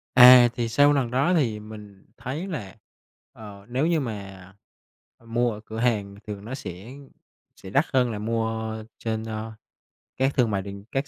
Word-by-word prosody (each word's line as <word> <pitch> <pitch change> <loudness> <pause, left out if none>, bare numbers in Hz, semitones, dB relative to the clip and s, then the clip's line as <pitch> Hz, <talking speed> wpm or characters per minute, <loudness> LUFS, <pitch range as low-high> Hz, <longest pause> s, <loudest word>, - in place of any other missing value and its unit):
À, 125 -1 +10
thì 120 -2 -2
sau 145 +5 +5
lần 130 -4 0
đó 135 +8 +2
thì 115 -10 +1
mình 105 -2 -12
thấy 150 +9 -5
là, 115 - -6 0.6
ờ, 100 -2 -12
nếu 130 +6 0
như 165 -2 +2
mà 95 -6 -7 0.7
mua 120 +1 0
ở 105 - -8
cửa 110 0 -6
hàng 105 -5 0
thì 105 - -3
nó 110 +6 -7
sẽ 105 +1 -8 0.6
sẽ 95 - -11
đắt 140 +10 +2
hơn 125 -2 +3
là 105 - -4
mua 110 0 -2 0.2
trên, 110 -1 -3
a, 110 0 -5 0.6
các 135 +1 +1
thương 120 -4 +2
mại 100 - 0
điện 100 0 -9
các 135 +2 -1
115 Hz, 175 wpm, -25 LUFS, 105-130 Hz, 0.7 s, À